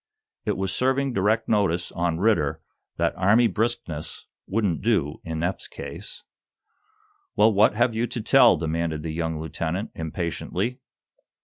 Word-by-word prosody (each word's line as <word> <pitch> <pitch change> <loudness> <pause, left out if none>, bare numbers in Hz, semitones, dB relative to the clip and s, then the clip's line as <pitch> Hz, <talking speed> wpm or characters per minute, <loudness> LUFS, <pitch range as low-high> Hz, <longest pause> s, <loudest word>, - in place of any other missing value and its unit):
It 105 - 0
was 95 0 -2
serving 135 +1 +1
direct 110 +3 +1
notice 90 -5 +1
on 85 -1 -1
Ridder 90 -7 +2 0.4
that - - +1
Army 105 +6 +4
briskness 110 -9 -2 0.2
wouldn't 100 -5 0
do 95 -10 0
in 80 0 -4
Eph's 90 +2 -2
case. - - -9 1.1
"Well, 110 +1 +5
what 105 +1 +4
have 120 +1 +2
you 115 +2 0
to 120 0 -4
tell?" 125 0 +6
demanded 80 -1 -2
the 80 -1 -4
young 80 -1 -2
lieutenant, 80 +5 -3
impatiently. 85 - -3
95 Hz, 135 wpm, -25 LUFS, 80-115 Hz, 1.1 s, tell